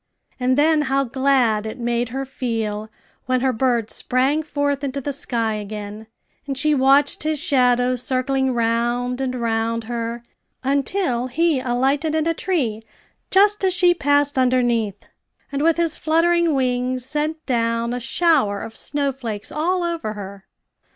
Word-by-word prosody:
And 255 +1 +1
then 310 +1 +4
how 275 +1 +2
glad 250 -4 +1
it 220 - -6
made 240 0 -1
her 270 +3 -4
feel 220 -5 -3 0.4
when 255 -1 +1
her 260 -1 +1
bird 235 -2 0
sprang 265 +5 +1
forth 285 -2 -2
into 280 0 -2
the 280 +1 -3
sky 230 -5 -1
again, 210 +1 -6 0.4
and 275 -1 -3
she 305 +3 +2
watched 275 +1 +3
his 310 0 0
shadow 255 -5 +2
circling 260 +1 0
round 240 +2 0
and 255 -1 -2
round 230 -1 -1
her, 235 0 -4 0.4
until 275 -1 0
he 315 +2 +1
alighted 270 +5 0
in 315 -1 +1
a 330 - +2
tree 275 - -1 0.5
just 410 +1 +4
as 375 -1 +2
she 355 -1 +5
passed 285 -3 +1
underneath, 240 -5 +1 0.5
and, 280 0 -2
with 330 +1 +3
his 335 -2 0
fluttering 335 0 +2
wings 255 -1 -1
sent 305 +3 -3
down 230 -1 0
a 245 - -2
shower 260 - +2
of 225 0 -8
snow 285 +2 -1
flakes 225 -5 -6
all 350 +4 0
over 335 -11 -2
her. 200 -1 -9
255 Hz, 150 wpm, -21 LUFS, 235-295 Hz, 0.5 s, she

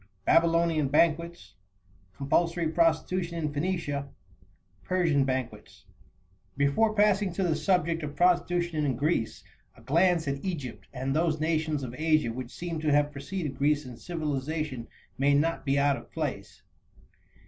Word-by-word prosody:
Babylonian 165 -2 +3
Banquets. 160 - +1 0.6
Compulsory 165 +4 +1
Prostitution 170 +1 +1
in 155 -3 -2
Phoenicia. 145 -3 -2 0.7
Persian 165 -7 +2
Banquets. 125 -5 -5 0.7
Before 145 +11 +2
passing 205 -2 +3
to 195 - -1
the 170 -3 +1
subject 165 0 +1
of 145 -1 -6
prostitution 175 -2 +2
in 135 -4 0
Greece, 115 -5 -1 0.3
a - - -16
glance 165 +5 +2
at 140 0 -3
Egypt, 150 -10 -5
and 135 +1 -3
those 160 -1 +1
nations 155 -2 0
of 125 -2 -5
Asia 155 -6 +1
which 125 0 -6
seem 170 +1 -5
to 155 -1 0
have 145 0 +3
preceded 145 0 -5
Greece 145 +1 +2
in 125 -1 -8
civilization, 150 -4 -3 0.3
may 140 +1 +4
not 165 +3 0
be 135 +1 +2
out 140 0 +3
of - - -13
place. - - -5
155 Hz, 135 wpm, -28 LUFS, 140-170 Hz, 0.7 s, may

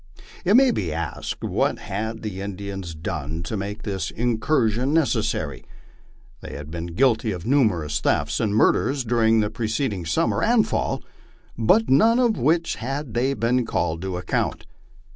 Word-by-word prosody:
It 195 +4 +4
may 260 0 +6
be 90 - -2
asked, 80 0 -4
What - - 0
had 110 +3 -5
the 100 -3 -5
Indians 95 -3 -6
done 80 0 -4
to 110 - -4
make 100 +2 -5
this 100 -3 -3
incursion 120 +2 +1
neces 130 -9 +2
sary? 70 -4 -3 0.8
They - - -8
had 75 +2 -8
been 85 0 -4
guilty 115 -2 +2
of 90 -4 -6
numerous 95 - +2
thefts 75 +2 0
and 105 -2 0
murders 130 +4 +2
during 115 -1 +3
the 105 - -1
preced 115 +2 -1
ing 90 -4 -5
summer 80 - +1
and - - +3
fall, - - -1 0.5
for 120 - +4
none 225 - +5
of 240 -3 +3
which 165 +5 +1
had 135 +2 -4
they 130 +4 +1
been 125 +1 +1
called 85 -7 -1
to 95 -1 -3
account. 90 - -2
110 Hz, 160 wpm, -23 LUFS, 90-130 Hz, 0.8 s, may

